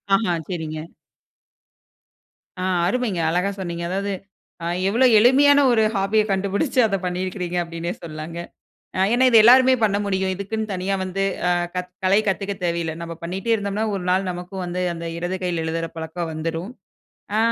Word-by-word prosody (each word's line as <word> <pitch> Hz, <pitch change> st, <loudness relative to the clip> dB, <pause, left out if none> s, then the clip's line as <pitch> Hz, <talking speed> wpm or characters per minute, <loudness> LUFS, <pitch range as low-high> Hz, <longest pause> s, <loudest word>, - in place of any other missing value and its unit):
அஹ. 195 Hz, -4 st, +1 dB
செரிங்க. 160 Hz, -4 st, -4 dB, 1.8 s
அ, -, -, -2 dB, 0.2 s
அருமைங்க. 220 Hz, -4 st, -1 dB
அழகா 180 Hz, +4 st, +1 dB
சொன்னீங்க. 170 Hz, -2 st, -4 dB
அதாவது, 200 Hz, +2 st, -2 dB, 0.5 s
அ -, -, -3 dB, 0.2 s
எவ்ளோ 235 Hz, +6 st, +3 dB
எளிமையான 280 Hz, +5 st, +6 dB
ஒரு 225 Hz, -2 st, +4 dB
ஹாபிய 195 Hz, +2 st, +2 dB
கண்டுபுடிச்சு. 200 Hz, +8 st, 0 dB
அத 195 Hz, -, 0 dB
பண்ணிருக்கிறீங்க 180 Hz, 0 st, -3 dB
அப்டீன்னே 170 Hz, +1 st, -4 dB
சொல்லலாங்க. 160 Hz, +1 st, -7 dB, 0.6 s
அ -, -, 0 dB
ஏன்னா, 255 Hz, +2 st, +4 dB
இத 230 Hz, -, +5 dB
எல்லாருமே 255 Hz, +2 st, +7 dB
பண்ண 200 Hz, -2 st, +2 dB
முடியும். 190 Hz, -1 st, 0 dB
இதுக்குன்னு 215 Hz, +2 st, -3 dB
தனியா 185 Hz, +2 st, -1 dB
வந்து 195 Hz, +1 st, -2 dB, 0.2 s
அ -, -, +3 dB, 0.2 s
க -, -, -1 dB, 0.3 s
கலை 195 Hz, +3 st, +4 dB
கத்துக்க 195 Hz, +1 st, -1 dB
தேவையில்ல. 170 Hz, -2 st, -1 dB
நம்ம 170 Hz, 0 st, -6 dB
பண்ணிட்டே 190 Hz, +6 st, -2 dB
இருந்தோம்னா 205 Hz, 0 st, -1 dB
ஒரு 185 Hz, -, -5 dB
நாள் 185 Hz, +1 st, +1 dB
நமக்கு 180 Hz, +1 st, -7 dB
வந்து 180 Hz, +1 st, -3 dB
அந்த 170 Hz, 0 st, -7 dB
இடது 175 Hz, +2 st, -3 dB
கையில 175 Hz, -3 st, -1 dB
எழுதுற 165 Hz, +1 st, -2 dB
பழக்கம் 160 Hz, +1 st, -4 dB
வந்துரும். 165 Hz, +4 st, -4 dB, 0.7 s
அ, -, -, +3 dB
185 Hz, 155 wpm, -22 LUFS, 170-200 Hz, 1.8 s, எல்லாருமே